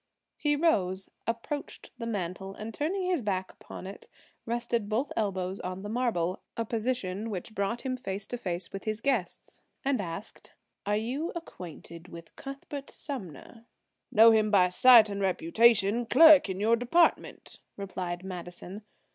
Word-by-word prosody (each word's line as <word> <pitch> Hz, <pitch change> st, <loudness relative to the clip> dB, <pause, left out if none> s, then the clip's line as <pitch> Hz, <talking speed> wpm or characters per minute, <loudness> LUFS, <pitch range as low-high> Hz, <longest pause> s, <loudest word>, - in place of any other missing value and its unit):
He 295 Hz, -1 st, +1 dB
rose, 195 Hz, -, +1 dB, 0.2 s
approached 235 Hz, +5 st, -4 dB
the 230 Hz, -, -4 dB
mantel, 195 Hz, -2 st, -4 dB
and 220 Hz, +1 st, -7 dB
turning 360 Hz, -, -1 dB
his 360 Hz, -5 st, +1 dB
back 190 Hz, -3 st, -2 dB
upon -, -, -11 dB
it, 195 Hz, +1 st, -9 dB, 0.4 s
rested 235 Hz, -2 st, -1 dB
both 240 Hz, +7 st, -1 dB
elbows 190 Hz, -3 st, -2 dB
on 185 Hz, +1 st, -5 dB
the 205 Hz, -, -5 dB
marble–a 225 Hz, -2 st, -2 dB
position 220 Hz, -3 st, -2 dB
which 205 Hz, +1 st, -5 dB
brought 200 Hz, +3 st, -1 dB
him 260 Hz, -1 st, -2 dB
face 200 Hz, -5 st, -5 dB
to 245 Hz, -, -4 dB
face 175 Hz, -4 st, -4 dB
with 195 Hz, -, -6 dB
his 215 Hz, 0 st, -2 dB
guests, 230 Hz, -9 st, -2 dB, 0.2 s
and 270 Hz, -5 st, +1 dB
asked: 180 Hz, +3 st, -8 dB, 0.3 s
"Are 205 Hz, 0 st, +2 dB
you 260 Hz, +10 st, -2 dB
acquainted 175 Hz, -, -9 dB
with 170 Hz, -1 st, -12 dB
Cuthbert 275 Hz, +1 st, -8 dB
Sumner?" 230 Hz, -, -7 dB, 0.5 s
"Know 225 Hz, +2 st, +8 dB
him 215 Hz, -1 st, +3 dB
by 185 Hz, -3 st, +5 dB
sight 230 Hz, +3 st, +8 dB
and 200 Hz, -1 st, -4 dB
reputation. 205 Hz, +5 st, +3 dB
Clerk 310 Hz, -4 st, +8 dB
in 190 Hz, 0 st, -3 dB
your 225 Hz, +3 st, +4 dB
department," 250 Hz, +9 st, +1 dB, 0.2 s
replied 185 Hz, -3 st, -5 dB
Madison. 180 Hz, +1 st, -8 dB
215 Hz, 145 wpm, -29 LUFS, 185-245 Hz, 0.5 s, Know